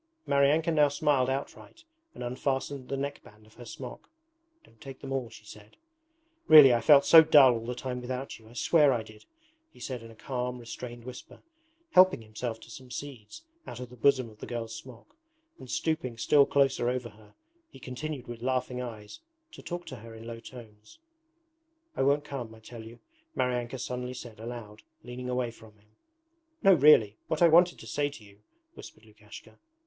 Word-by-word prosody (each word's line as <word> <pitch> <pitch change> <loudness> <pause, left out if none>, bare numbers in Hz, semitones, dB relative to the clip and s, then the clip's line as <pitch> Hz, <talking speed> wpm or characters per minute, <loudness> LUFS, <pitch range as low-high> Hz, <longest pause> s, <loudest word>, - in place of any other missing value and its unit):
Maryanka 145 +4 +2
now 150 -2 +4
smiled 145 -2 +1
outright 140 - -6 0.3
and - - -7
unfastened 130 +1 -3
the 135 - -2
neckband 135 -6 -7
of 110 - -21
her 120 - -12
smock. 125 +2 -9 0.5
'Don't 115 - -24
take 135 -1 -10
them 135 0 -6
all,' 130 -3 -2
she 110 -2 -15
said. 105 0 -14 0.7
'Really 145 -5 +9
I 120 - +1
felt 140 +3 +6
so 165 +2 +9
dull 145 -5 +7
all 115 0 -5
the 125 - -3
time 125 0 -5
without 130 +1 -6
you, 110 0 -18
I - - -16
swear 145 +2 +3
I 115 -2 -2
did,' 110 -1 -16 0.5
he - - -19
said 125 -3 -5
in 115 - -12
a 115 - -14
calm, 125 +2 -4
restrained 120 0 -9
whisper, 125 +1 -11 0.5
helping 185 - +5
himself 110 +1 -5
to 115 - -14
some 130 +3 -11
seeds 135 - -9 0.2
out 120 - -8
of 125 -1 -8
the - - -12
bosom 130 0 +2
of 110 -1 -16
the - - -8
girl's 115 -2 -5
smock, 120 0 -13 0.4
and 130 - -12
stooping 155 -7 -2
still 140 +4 +4
closer 135 -3 +2
over 125 -1 -3
her 105 -1 -20 0.3
he - - -15
continued 130 +1 -6
with 120 -1 -8
laughing 125 0 -2
eyes 110 -4 -8 0.3
to - - -12
talk 175 0 -6
to - - -8
her 115 +1 -12
in 110 0 -11
low 115 0 -7
tones. 110 - -14 1.0
'I - - -1
won't 140 +2 +2
come, 125 -6 -7
I - - -16
tell 115 +1 -11
you,' 115 +1 -12 0.4
Maryanka 125 0 -1
suddenly 125 0 -5
said 115 -3 -10
aloud, 110 -2 -8 0.2
leaning 125 +1 -7
away 125 -1 -1
from 110 -2 -17
him. 105 +1 -30 0.7
'No 195 - +7
really... 130 - +5
what 160 +2 0
I - - +8
wanted 175 +2 +5
to - - -12
say 145 +6 -1
to 140 -6 -13
you, 100 0 -19 0.2
...' 335 0 -47
whispered - - -13
Lukashka. - - -15
125 Hz, 190 wpm, -28 LUFS, 115-140 Hz, 1.0 s, Really